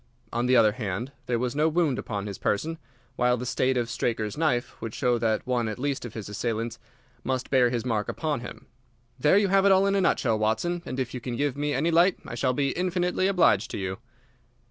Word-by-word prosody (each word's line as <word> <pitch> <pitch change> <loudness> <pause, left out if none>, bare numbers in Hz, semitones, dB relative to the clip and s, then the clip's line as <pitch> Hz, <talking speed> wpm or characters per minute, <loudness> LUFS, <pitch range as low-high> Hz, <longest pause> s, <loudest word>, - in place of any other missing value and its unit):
"On 120 +1 0
the 130 - +4
other 110 -2 +6
hand, 110 +3 -4 0.2
there 120 - +1
was 125 +2 -2
no 155 +2 +3
wound 160 -5 +1
upon 100 -3 -4
his 100 -2 -6
person, 160 +10 -1 0.4
while 125 0 +3
the 125 - -5
state 130 +1 +1
of 120 -1 0
Straker's 110 -2 -2
knife 150 -6 -1
would 115 -1 -5
show 120 -1 +1
that 110 -1 0
one 125 -2 0
at 110 - -4
least 140 0 -2
of 120 - -8
his 110 -3 -6
assailants 115 +2 -3 0.4
must 130 0 -2
bear 130 -3 +4
his 120 -1 -2
mark 110 -4 -1
upon 155 -4 -2
him. 120 - -9 0.5
There 150 +8 +4
you 205 -1 +3
have 195 0 +4
it 200 - +5
all 190 +1 +5
in 200 - +2
a 200 - +2
nutshell, 115 -10 +2
Watson, 110 +12 0
and 130 - -4
if 125 -2 -2
you 125 - -4
can 120 0 -4
give 140 +1 0
me 145 0 -1
any 155 +6 +1
light 175 +3 +4
I - - -7
shall 125 +2 0
be 140 +1 0
infinitely 180 +1 0
obliged 120 - +3
to - - -5
you." 95 0 -4
125 Hz, 230 wpm, -26 LUFS, 115-155 Hz, 0.5 s, other